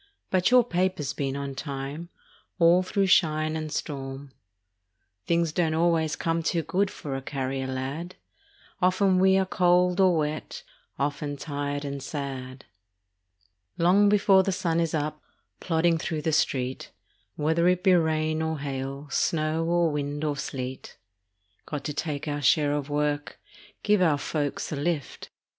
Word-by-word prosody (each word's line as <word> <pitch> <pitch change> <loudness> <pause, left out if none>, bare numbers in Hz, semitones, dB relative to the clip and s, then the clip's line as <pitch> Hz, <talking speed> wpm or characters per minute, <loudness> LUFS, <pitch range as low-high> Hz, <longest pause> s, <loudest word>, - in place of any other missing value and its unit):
But 185 -1 +3
your 250 0 +6
paper's 180 - -1
been 135 -2 -2
on 140 -1 -4
time 140 +4 -6 0.5
All 170 +1 +5
through 195 +2 0
shine 155 -4 +3
and 155 -1 -4
storm. 135 -2 -5 1.0
Things 170 -1 +2
don't 160 -1 0
always 165 -2 +2
come 165 0 -1
too 165 0 0
good 185 +5 0
For 140 -6 -6
a 135 - -4
carrier 135 -1 -3
lad. 135 +7 -4 0.7
Often 185 +1 +3
we 190 0 +5
are 190 - +2
cold 180 0 +2
or 185 -3 +5
wet, 155 - -3 0.3
Often 145 0 -2
tired 145 0 -4
and 140 -1 -4
sad. 135 -2 -6 1.1
Long 190 +4 +4
before 200 -2 +5
the 195 - -1
sun 170 -3 0
is 165 -1 0
up, 150 0 -3 0.4
Plodding 165 -1 +1
through 155 -1 -3
the 160 - +1
street, 130 -4 0 0.5
Whether 160 +3 +1
it 180 0 +2
be 190 -2 +5
rain 155 -2 +1
or 160 0 -1
hail, 140 0 -5
Snow 155 0 0
or 170 -1 +2
wind 145 0 -3
or 150 -2 0
sleet. 130 -2 -6 0.7
Got 145 -2 -4
to 150 - -3
take 150 -1 -3
our 145 0 -2
share 145 0 +3
of 145 -1 -3
work, 145 0 -1 0.4
Give 210 -2 +3
our 160 -5 +4
folks 145 0 -3
a - - -2
lift. 145 -1 -3
155 Hz, 150 wpm, -26 LUFS, 145-175 Hz, 1.1 s, your